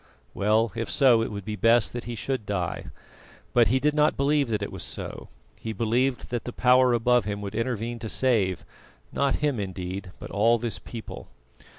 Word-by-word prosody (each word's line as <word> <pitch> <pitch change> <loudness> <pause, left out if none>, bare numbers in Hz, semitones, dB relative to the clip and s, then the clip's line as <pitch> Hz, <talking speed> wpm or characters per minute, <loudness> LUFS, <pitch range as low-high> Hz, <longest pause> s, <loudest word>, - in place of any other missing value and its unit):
Well, 110 +2 +2
if 115 0 -3
so, 125 -5 +4
it 115 - -2
would 100 -2 -6
be 105 0 -3
best 115 +2 +3
that 120 0 -5
he 120 - -5
should 120 0 -3
die. 90 -3 -2 0.7
But 120 -2 +5
he 130 +4 +2
did 150 +2 +1
not 150 +1 +2
believe 140 -1 +2
that 105 -2 -1
it - - -4
was - - -7
so; - - -6 0.3
he 110 - -5
believed 120 +5 0
that 120 -2 -2
the 125 - -4
Power 125 +1 +4
above 120 -1 +3
him 100 -1 -3
would 100 -1 -5
intervene 115 0 -2
to 110 - -5
save 105 -10 +1 0.5
not 140 -1 +1
him, 140 -6 0
indeed, 95 0 -5
but - - -9
all 115 +4 +3
this 115 0 -2
people. 115 -2 -9
115 Hz, 195 wpm, -26 LUFS, 105-125 Hz, 0.7 s, But